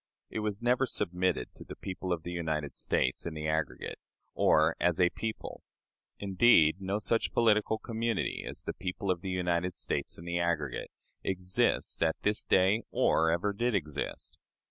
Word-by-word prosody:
It - - -3
was 105 0 -2
never 125 +2 +3
submitted 90 - -1
to - - -10
"the - - -9
people 95 -1 -5
of 85 -2 -1
the 90 - -5
United 80 -4 -2
States 65 +5 +1
in 80 - -5
the 75 0 -3
aggregate," 80 -5 -2 0.3
or 80 +1 +4
as 90 0 +2
a 90 -1 +4
people. 110 -1 -5 0.6
Indeed, 95 -4 +4
no 95 +2 -1
such 110 +2 0
political 110 -1 +3
community 115 0 -2
as - - -6
the - - -3
people 95 +1 -3
of 90 -2 -2
the 95 - -4
United 90 -1 0
States 70 - -2
in 85 - -10
the 85 0 -1
aggregate 80 -6 -1 0.3
exists 90 -1 +1
at 80 -1 +1
this 105 +1 +2
day 95 +4 +4
or 80 0 +3
ever 85 +5 +1
did 120 +2 0
exist. 75 -7 -3
90 Hz, 165 wpm, -30 LUFS, 80-105 Hz, 0.6 s, or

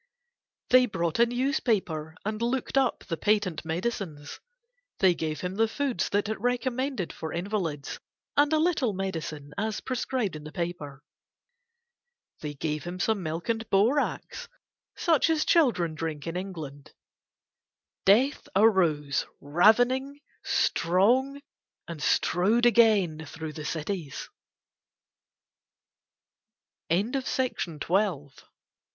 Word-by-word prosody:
They 255 0 +7
brought 170 -3 -2
a 235 - +6
newspaper 225 - -1
and 215 +1 -3
looked 250 +3 -1
up 270 -2 +2
the 165 - -4
patent 205 -6 +1
medicines; 165 -3 -4 0.6
they 190 -2 +4
gave 155 -3 -3
him 180 +2 -4
the 225 0 +3
foods 270 +2 -1
that 205 +1 0
it 215 -1 -4
recommended 245 - -1
for 160 - -6
invalids, 170 -6 -3 0.4
and 290 +1 +4
a 315 - +4
little 310 - +1
medicine 160 -6 -5
as 215 +1 -1
prescribed 250 -6 -2
in 150 - -8
the 155 - -9
paper. 165 -6 -5 1.4
They 150 -1 -5
gave 150 +1 -3
him 175 +1 -6
some 215 +1 +1
milk 165 0 -4
and 225 -1 -2
borax, 270 - +1 0.5
such 325 -2 +3
as 320 -1 +2
children 235 - +3
drink 155 -2 -4
in 165 0 -4
England. 160 -7 -7 1.1
Death 255 +10 +3
arose 170 -10 +3
ravening, 245 - +3 0.2
strong, 240 +12 +2 0.5
and 165 -3 -7
strode 205 +11 +2
again 210 -9 +4
through 160 0 -7
the 155 -1 -7
cities. 160 -2 -4 2.6
THE 165 - +4
LONELY 200 +6 0
IDOL - - -8
I 265 0 0
had 255 - -4
from 165 -4 -4 0.2
a 165 -10 -1
195 Hz, 120 wpm, -27 LUFS, 160-240 Hz, 2.6 s, They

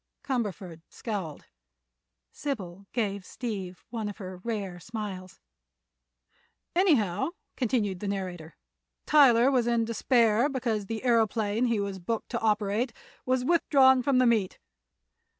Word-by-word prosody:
Cumberford 200 - -3
scowled; 195 -10 -5 0.9
Sybil 195 -9 -5
gave 200 -5 -1
Steve 195 -6 -6
one 220 -3 -3
of 205 - -8
her 185 -3 -7
rare 195 -3 -4
smiles. 195 -3 -7 1.4
"Anyhow," 270 - +2 0.3
continued 215 -7 0
the 205 - -4
narrator, 180 -5 -5 0.5
"Tyler 265 -4 +6
was 245 -3 +2
in 235 -1 +2
despair 230 +1 +3
because 230 -7 -2
the 225 +2 -4
aëroplane 225 -1 +2
he 230 -3 +1
was 200 -1 -3
booked 220 +6 -3
to 235 - -2
operate 215 +2 0 0.3
was 255 -1 +1
withdrawn 270 -5 +5
from 265 +1 +2
the 255 - +5
meet. 220 -6 +2
220 Hz, 120 wpm, -28 LUFS, 195-245 Hz, 1.4 s, Tyler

